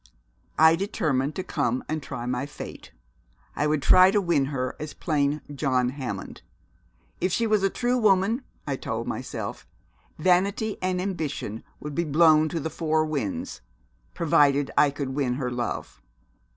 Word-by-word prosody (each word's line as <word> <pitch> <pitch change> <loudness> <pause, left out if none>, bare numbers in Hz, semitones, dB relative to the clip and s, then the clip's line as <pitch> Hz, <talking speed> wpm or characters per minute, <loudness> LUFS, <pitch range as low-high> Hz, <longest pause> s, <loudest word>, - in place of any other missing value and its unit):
I 160 +1 +7
determined 155 -7 -1
to 185 - -3
come 125 -8 -1
and 155 0 -2
try 120 -3 -6
my 125 +2 -2
fate. 145 - -9 0.6
I 150 - +1
would 150 -2 0
try 185 0 +7
to 205 - +3
win 170 -7 +2
her 130 -2 -3
as 150 -1 -6
plain 150 -2 0
John 130 -3 +1
Hammond. 125 -8 -6 0.8
If 185 - 0
she 230 - +1
was 215 -2 +2
a 195 - +2
true 245 +4 0
woman, 215 +3 +3 0.2
I - - -2
told - - -4
myself, - - -5 0.5
vanity 200 +4 +1
and 185 -1 0
ambition 155 - -3 0.2
would 150 0 -6
be 170 - 0
blown 155 0 +4
to 165 - -2
the 160 +1 -4
four 155 0 +1
winds, 140 -11 -3 0.5
provided 145 -3 +3
I 145 - +5
could 140 -1 -4
win 130 -2 -1
her 125 -2 -3
love. 120 -1 -4
155 Hz, 155 wpm, -26 LUFS, 135-185 Hz, 0.8 s, I